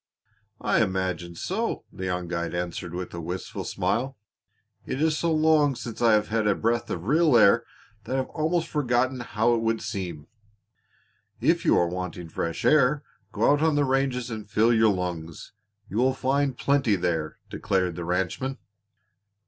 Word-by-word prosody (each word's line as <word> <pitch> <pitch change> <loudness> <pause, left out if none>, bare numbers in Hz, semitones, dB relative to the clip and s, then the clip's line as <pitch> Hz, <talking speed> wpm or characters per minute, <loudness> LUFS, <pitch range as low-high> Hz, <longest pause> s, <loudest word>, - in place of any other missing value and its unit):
"I - - +2
imagine 95 -2 -2
so," 215 - -2
the 95 - -5
young 90 -1 -2
guide 85 0 -3
answered 85 0 -4
with 90 0 -5
a 85 - -5
wistful 90 +3 -5
smile. 130 +4 -1 0.7
"It 130 - -4
is 155 0 +2
so 165 +2 0
long 155 -3 +3
since 120 -2 -7
I 115 -2 +5
have 105 -1 +2
had 110 -1 +1
a 105 - +3
breath 115 +1 0
of 85 - -4
real 150 +1 +4
air 115 +2 +5 0.4
that 130 - -2
I - - +1
have 130 - -2
almost 165 +1 0
forgotten 130 -2 0
how 115 0 +1
it 115 - +1
would 115 0 0
seem." 85 -6 -5 1.1
"If - - +2
you - - +5
are 85 - +4
wanting 90 -1 -5
fresh 85 +1 -3
air 150 -1 +4 0.3
go - - +3
out 145 0 +2
on 160 -2 +3
the 145 -1 +3
ranges 130 -2 0
and 110 -2 -6
fill 110 +4 +3
your 110 -1 +4
lungs. 85 -4 -5 0.4
You 105 - -5
will 130 +2 +3
find 135 0 0
plenty 140 -7 +2
there," 80 -4 -2
declared 90 -3 0
the 85 - -5
ranchman. 95 +10 -2
115 Hz, 170 wpm, -26 LUFS, 90-135 Hz, 1.1 s, I